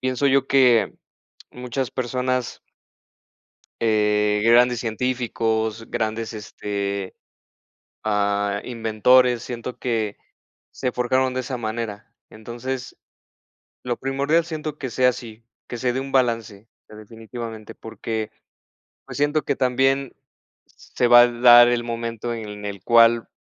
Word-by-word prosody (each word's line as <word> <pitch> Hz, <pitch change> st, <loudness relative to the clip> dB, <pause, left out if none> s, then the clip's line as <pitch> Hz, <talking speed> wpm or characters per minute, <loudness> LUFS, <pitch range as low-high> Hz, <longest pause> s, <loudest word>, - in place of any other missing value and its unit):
pienso 130 Hz, +2 st, 0 dB
yo 135 Hz, -1 st, +3 dB
que 125 Hz, -4 st, +4 dB, 0.6 s
muchas 125 Hz, +1 st, -4 dB
personas 130 Hz, 0 st, -2 dB, 1.2 s
eh 105 Hz, -1 st, +2 dB
grandes 120 Hz, +1 st, +4 dB
científicos 115 Hz, -2 st, -2 dB
grandes 110 Hz, +1 st, -3 dB
este, 100 Hz, -2 st, -5 dB, 0.9 s
ah, 100 Hz, -1 st, 0 dB
inventores. 120 Hz, +1 st, +2 dB
Siento 125 Hz, 0 st, -7 dB
que, 110 Hz, -4 st, -2 dB, 0.6 s
se 125 Hz, -, -2 dB
forjaron 130 Hz, +1 st, +1 dB
de 130 Hz, -, -1 dB
esa 130 Hz, 0 st, -5 dB
manera, 110 Hz, -2 st, -5 dB, 0.2 s
entonces, 120 Hz, +4 st, -7 dB, 0.9 s
lo 120 Hz, -1 st, -2 dB
primordial 140 Hz, +5 st, 0 dB
siento 155 Hz, -2 st, -5 dB
que 130 Hz, -, -4 dB
sea 125 Hz, +1 st, +3 dB
así, 115 Hz, -2 st, -10 dB, 0.2 s
que 120 Hz, -, -5 dB
se 125 Hz, 0 st, 0 dB
dé 130 Hz, -, -2 dB
un 135 Hz, 0 st, -7 dB
balance, 115 Hz, -5 st, -1 dB, 0.2 s
eh, -, -, -14 dB
definitivamente, 110 Hz, 0 st, -9 dB
porque 110 Hz, -1 st, -5 dB, 0.8 s
pues -, -, -8 dB
siento 145 Hz, +1 st, +1 dB
que -, -, 0 dB
también 135 Hz, +1 st, +1 dB, 0.5 s
se 125 Hz, -, -3 dB
va 120 Hz, 0 st, +9 dB
a 120 Hz, -, +4 dB
dar 120 Hz, 0 st, +7 dB
el 120 Hz, -1 st, 0 dB
momento 115 Hz, 0 st, -4 dB
en 105 Hz, -2 st, -8 dB
el 100 Hz, -2 st, -6 dB
cual, 115 Hz, 0 st, +4 dB
120 Hz, 120 wpm, -22 LUFS, 110-130 Hz, 1.2 s, va